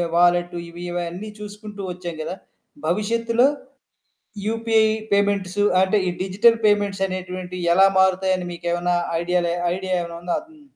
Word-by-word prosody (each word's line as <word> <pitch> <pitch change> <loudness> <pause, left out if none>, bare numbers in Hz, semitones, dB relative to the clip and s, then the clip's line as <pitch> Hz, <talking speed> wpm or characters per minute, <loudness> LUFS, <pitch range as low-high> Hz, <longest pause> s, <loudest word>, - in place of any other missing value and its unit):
Wallet 175 0 +3
ఇవి 175 +1 -9
ఇవన్నీ 175 +4 -4
చూసుకుంటూ 210 0 -8
ఒచ్చేం 175 -2 -6
గదా! 180 +4 -4 0.5
భవిష్యత్తులో 230 +5 +2 1.0
యూపీఐ 225 0 +2 0.3
పేమెంట్స్ 200 -1 +1 0.2
అంటే 190 +3 +3
ఈ - - +1
డిజిటల్ 210 +5 +4
పేమెంట్స్ 205 -2 +2
అనేటువంటివి 185 -1 -5
ఎలా 195 +1 +7
మారుతాయని 190 -1 +2
మీకెమన్నా 175 +1 -1 0.2
ఐడియాలు 175 0 0 0.2
ఐడియా 185 0 -2
ఏవన్నా 170 0 -7
ఉందా? 175 0 -1
అదున్ 315 -1 -18
185 Hz, 125 wpm, -22 LUFS, 175-210 Hz, 1.0 s, ఎలా